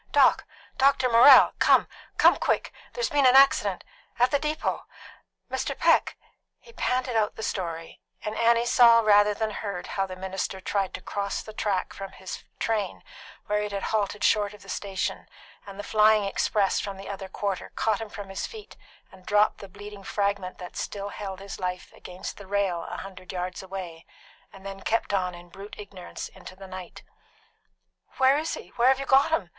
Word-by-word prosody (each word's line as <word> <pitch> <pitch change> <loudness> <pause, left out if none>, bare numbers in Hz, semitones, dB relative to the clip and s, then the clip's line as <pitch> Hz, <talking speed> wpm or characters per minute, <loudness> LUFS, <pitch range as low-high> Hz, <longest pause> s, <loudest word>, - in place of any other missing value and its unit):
"Doc - - +4 0.3
Doctor 265 -1 +4
Morrell, 250 +3 +8
come - - +5 0.3
come - - +6
quick! - - -1 0.2
There's 480 -7 -2
been 285 -3 +4
an 250 - +5
accident 210 -8 +5 0.3
at 245 +1 +3
the 285 - +2
depot. 305 +1 -2 0.6
Mr. - - -3
Peck - - +3 0.2
" - - -56
He 470 - -18
panted 255 - -1
out 215 -2 +1
the 220 - -7
story, 165 -5 -4 0.2
and 215 0 -4
Annie 235 0 +3
saw 235 -1 +6
rather 205 -1 +5
than 220 0 -2
heard 200 -4 -5
how 195 -1 -2
the 185 - -7
minister 190 +1 -4
tried 195 0 -2
to - - -8
cross 200 -1 -3
the 215 - -10
track 200 -3 -1
from 195 -1 -8
his 190 0 -8
train, 210 -5 -2 0.4
where 210 -1 0
it 210 0 -4
had 200 -1 -4
halted 210 -1 -1
short 210 -1 +2
of 205 - -16
the 195 - -14
station, 195 -2 -3 0.4
and 195 -1 -9
the 205 - -5
flying 215 0 +4
express 200 0 +1
from 200 -1 -5
the 195 - -9
other 195 -1 -6
quarter 195 -1 -3
caught 220 -1 0
him 220 - -6
from 205 -1 -8
his 195 - -4
feet, 435 -1 -11 0.4
and 185 -1 -18
dropped 210 +1 +3
the 200 - -10
bleeding 205 +1 -11
fragment 200 -2 -2
that 180 -1 -9
still 200 -1 -4
held 195 -2 -6
his 195 0 -8
life 180 -1 -4
beside 180 +2 -8
the 200 - -11
rail 195 -4 -1
a - - -5
hundred 185 -1 -9
yards 185 0 -4
away, 185 -4 -8 0.4
and 195 0 -15
then 195 0 -7
kept 225 -1 -1
on 180 -2 0
in 175 0 -13
brute 195 +4 -10
ignorance 195 -3 -8
into 185 - -12
the 195 +1 -11
night. 185 -2 -9 1.1
"Where 270 +2 +4
is 320 +1 -3
he? - - -10
Where 240 +1 +4
have 265 0 +4
you 275 - -3
got 270 +3 +5
him?" 220 - 0
200 Hz, 190 wpm, -26 LUFS, 190-225 Hz, 1.1 s, Morrell